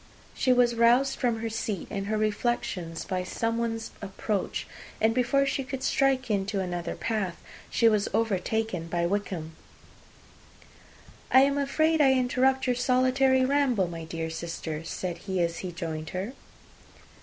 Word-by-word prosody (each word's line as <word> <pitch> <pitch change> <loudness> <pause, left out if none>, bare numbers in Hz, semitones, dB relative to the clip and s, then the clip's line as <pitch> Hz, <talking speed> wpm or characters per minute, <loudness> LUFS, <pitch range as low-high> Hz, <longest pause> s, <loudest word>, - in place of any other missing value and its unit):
She 255 - +1
was 245 -1 +4
roused 240 +4 +3
from 235 -3 0
her 225 - -2
seat 210 -4 -3
and 195 0 -3
her 215 +1 0
reflections, 210 -6 -1
by 185 -1 -2
someone's 230 +3 -2
approach; 200 0 -3 0.3
and, 220 +1 +3
before 255 +3 +2
she 275 0 -1
could 260 0 -5
strike 270 -3 +2
into 200 0 0
another 175 -2 -3
path, 205 -6 -2 0.3
she 230 - +3
was 210 -2 +2
overtaken 220 -3 -1
by 170 0 0
Wickham. 175 -4 -3 1.8
"I 260 - +8
am 280 +1 +3
afraid 310 +3 +2
I 270 -2 +6
interrupt 260 +1 +2
your 250 -1 +2
solitary 260 +1 +3
ramble, 260 -8 +2
my 165 -1 -6
dear 160 0 -4
sister?" 160 -1 -5
said 175 +1 -4
he, 190 -2 -3
as 170 -1 0
he 185 - -5
joined 160 -2 -5
her. 200 +7 -3
225 Hz, 145 wpm, -27 LUFS, 180-255 Hz, 1.8 s, I